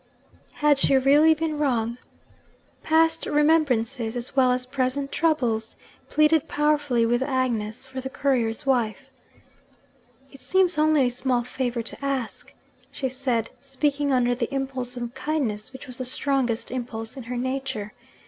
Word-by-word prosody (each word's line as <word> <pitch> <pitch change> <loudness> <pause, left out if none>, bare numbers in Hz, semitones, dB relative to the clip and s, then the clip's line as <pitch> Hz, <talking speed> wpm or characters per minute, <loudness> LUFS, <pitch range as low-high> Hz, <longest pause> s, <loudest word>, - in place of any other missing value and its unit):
Had 295 -2 +3
she 275 - +5
really 295 +4 +5
been 310 -1 -2
wrong? 240 -4 0 0.8
Past 325 +1 +2
remembrances, 270 -6 +2
as 245 +2 -4
well 255 -2 +4
as 250 0 0
present 270 +1 -1
troubles, 240 -9 0 0.3
pleaded 305 0 +3
powerfully 290 -5 +1
with 240 +2 +1
Agnes 245 -5 -1
for 265 0 -7
the 265 - -5
courier's 255 -3 0
wife. 240 -5 0 1.2
'It 275 - -14
seems 355 +4 +2
only 310 -1 +4
a 250 - +2
small 250 -1 0
favour 245 -1 -3
to 230 - -5
ask,' 270 -4 -3 0.4
she 265 - -3
said, 250 -3 -1
speaking 280 +1 -1
under 245 -2 +2
the 240 -1 -3
impulse 260 -2 -3
of 240 0 -5
kindness 260 -7 -2
which 265 0 -10
was 255 0 -8
the 255 - -2
strongest 255 -3 0
impulse 235 -2 -5
in 270 - -7
her 245 +1 -4
nature. 260 -4 -3
260 Hz, 145 wpm, -25 LUFS, 240-285 Hz, 1.2 s, she